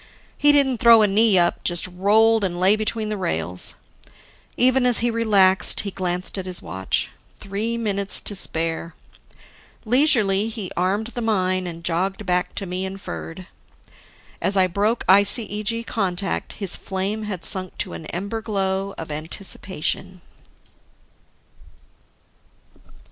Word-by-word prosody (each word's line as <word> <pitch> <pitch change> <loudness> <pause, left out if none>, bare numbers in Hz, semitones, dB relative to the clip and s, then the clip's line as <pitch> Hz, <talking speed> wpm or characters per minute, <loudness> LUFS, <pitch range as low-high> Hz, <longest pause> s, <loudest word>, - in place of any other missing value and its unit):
He 290 - +5
didn't 270 -4 +2
throw 230 -2 +7
a - - +4
knee 205 0 +4
up, 175 -1 +1
just 175 -1 -1
rolled 210 +5 +2
and 175 -2 -2
lay 190 +3 +5
between 215 0 -2
the 210 - -3
rails. 85 - -3 0.8
Even 255 +1 +3
as 245 - +4
he 240 - +1
relaxed, 200 -5 +3
he 200 - -5
glanced 180 +1 -3
at 185 - -6
his 180 -1 -3
watch: 95 +3 -3 0.3
three 210 +4 -3
minutes 200 -3 +2
to - - -3
spare. 165 -3 -3 0.9
Leisurely, 220 -5 +3
he 215 -5 -6
armed 200 +6 -1
the 240 - -4
mine 185 -4 0
and 170 -1 -8
jogged 190 +5 -2
back 180 -1 -1
to 200 - -2
me 180 +1 -4
and 190 +1 -6
Ferd. 185 -1 -8 1.0
As 195 +1 0
I 190 - +5
broke 205 +6 -1
ICEG 210 +3 +2
contact, 195 -3 -2
his 195 -4 -1
flame 195 +3 -3
had 190 -5 -5
sunk 185 -2 +5
to - - -2
an 160 - -8
ember 200 +6 -4
glow 195 -2 -2
of 160 -2 -7
anticipation. 185 +3 -4
195 Hz, 140 wpm, -22 LUFS, 180-220 Hz, 1.0 s, throw